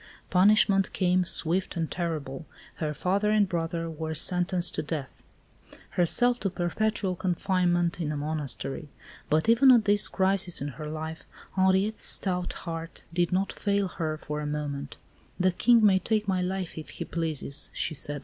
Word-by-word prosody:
Punishment 195 +1 +4
came, 185 -1 +1
swift 175 +1 -1
and 165 -2 -3
terrible. 155 -4 -5 0.3
Her 155 -2 -3
father 195 +7 -1
and 210 -1 +3
brother 165 -1 -3
were 160 0 -5
sentenced 180 +2 +3
to - - -1
death, 150 -3 -6 0.7
herself 245 +8 +2
to 195 - -1
perpetual 190 +2 -2
confinement 175 -1 0
in 150 -2 -2
a 150 - -4
monastery. 150 -1 -4 0.4
But 155 +5 +1
even 240 +4 +6
at 235 -4 +4
this 205 0 +3
crisis 190 -2 +1
in 140 - -4
her 150 +2 -8
life, 160 +1 -7 0.3
Henriette's 190 +3 +2
stout 180 -2 +6
heart 165 0 -7
did 175 0 0
not 190 +2 -1
fail 200 -2 -1
her 155 -2 -4
for 150 0 -6
a 150 - -4
moment. 145 -2 -5 0.4
"The 185 0 +2
King 230 +4 +3
may 190 -2 +4
take 215 +2 -1
my 185 -2 0
life, 185 -2 -4
if 155 - -9
he - - -7
pleases," 155 -4 -1
she 160 - -2
said. 145 0 -4
175 Hz, 160 wpm, -27 LUFS, 160-195 Hz, 0.7 s, even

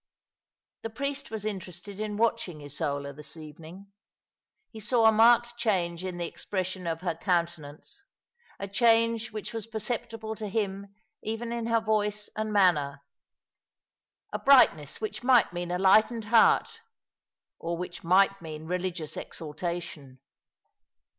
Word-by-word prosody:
The 225 - -4
priest 280 +5 -4
was 220 -1 -5
interested 190 -1 -6
in 210 -1 -3
watching 220 -9 0
Isola 145 -1 -3
this 150 +3 -9
evening. 160 +5 -11 0.8
He 220 - -9
saw 225 +2 +2
a 220 - +8
marked 235 +2 +5
change 180 -7 0
in 185 -2 -4
the 175 - -2
expression 185 +1 -4
of 165 0 -2
her 175 -2 -1
counte 170 0 0
nance, 150 - -10 0.6
a 200 - -4
change 230 +2 +3
which 215 +1 -6
was 225 -1 -5
perceptible 225 0 -4
to 215 - -4
him 200 -1 -3 0.3
even 225 +2 -4
in 235 -1 -3
her 230 0 +3
voice 210 -1 -1
and 215 0 -2
manner 150 -9 +2 0.6
— - - -46
a - - -2
brightness 170 - +5
which 215 0 -4
might 245 -6 +4
mean 175 0 -4
a 180 - 0
lightened 215 +4 +4
heart, 230 - +4 0.8
or 170 +1 -3
which 175 0 -6
might 195 +2 +4
moan 155 -1 -8
religious 180 -2 -3
exalta 170 +3 -4
tion. 140 -6 -10
195 Hz, 140 wpm, -28 LUFS, 170-225 Hz, 0.8 s, a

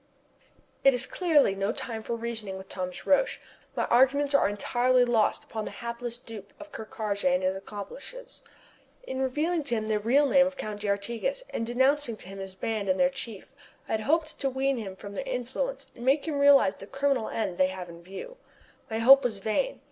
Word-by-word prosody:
It 275 -2 +6
is 245 +1 0
clearly 310 - +3
no 195 +2 -1
time 225 -1 -5
for 235 - -3
reasoning 225 -4 -4
with 190 0 -10
Thomas 180 -1 -5
Roch. 290 - +3 0.4
My - - +1
arguments 275 +3 +3
are 280 - +4
entirely 245 +4 +2
lost 230 -3 +2
upon 220 -1 -5
the - - -4
hapless 235 0 -5
dupe 220 -5 -11
of 310 0 -11
Ker 220 - -7
Karraje 200 -4 -1
and 180 +1 +1
his 185 +1 +1
accomplices. 350 - -9 0.6
In 260 - -4
revealing 305 +6 0
to 240 - 0
him 215 -1 -2
the 215 -1 0
real 255 +7 +3
name 270 0 +5
of 280 - -5
the - - -20
Count 210 -1 -4
d'Artigas, 225 - -1
and 230 - -2
denouncing 260 0 +2
to 185 - -10
him 195 0 -8
this 190 -1 -6
band 210 -1 -2
and 185 - +2
their 270 0 +4
chief 235 -4 -7 0.3
I - - -7
had 220 - +1
hoped 310 +5 0
to 275 - +1
wean 265 +1 0
him 195 -5 -5
from 200 +1 -9
their 235 - -3
influence 265 - -3
and 240 - -9
make 275 +4 +2
him 295 -3 -1
realize 280 -9 +6
the 195 - -10
criminal 275 -2 0
end 190 -6 -3
they 185 - +5
have 185 -1 -6
in 170 0 -11
view. 195 - -9 0.5
My 220 - -2
hope 270 +4 +8
was 225 -5 -1
vain. 220 - -1
235 Hz, 210 wpm, -28 LUFS, 205-275 Hz, 0.6 s, hope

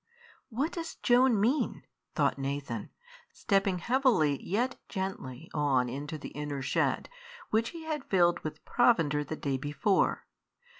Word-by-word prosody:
"What 270 +7 -1
does 330 -2 -5
Joan 245 -2 +4
mean?" 245 +9 +1 0.3
thought - - +1
Nathan, 135 -5 -3 0.4
stepping 195 -2 +1
heavily 225 - +2
yet 235 +7 -1
gently 170 - -5
on 135 -5 +2
into 145 +5 -5
the 145 - -8
inner 145 -2 -4
shed, - - 0 0.4
which 225 +1 +2
he 335 -1 -9
had 310 -3 -3
filled 175 -3 +3
with 155 - -7
provender 165 -12 +3
the 155 +2 -5
day 140 -3 -2
before. 145 +8 +1
175 Hz, 135 wpm, -30 LUFS, 145-240 Hz, 0.4 s, Joan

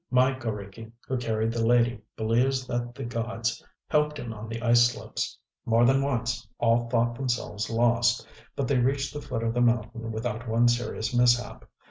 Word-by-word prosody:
My 130 +1 +4
g┼Źriki, 110 -3 -6 0.2
who 130 - -1
carried 115 -2 -1
the 115 0 -1
lady, 120 -1 +3 0.2
believes 125 +4 +1
that 120 -1 -3
the 135 - -6
gods 115 -1 -3 0.2
helped 150 -1 +1
him 120 -5 -5
on 110 0 -8
the 115 0 -4
ice 120 0 +5
slopes. - - -5 0.3
More 115 +1 +3
than 135 +2 +4
once, 120 -4 -1
all 115 0 +2
thought 120 0 +2
themselves 120 -4 -2
lost; 120 +1 +2 0.3
but 140 - -1
they 135 -1 +2
reached 135 +2 0
the 145 - -5
foot 125 -6 -4
of 115 0 0
the 120 - +1
mountain 115 -1 0
without 115 +1 -4
one 115 +2 +4
serious 120 -1 -1
mishap. 120 0 +2
120 Hz, 175 wpm, -27 LUFS, 115-125 Hz, 0.3 s, ice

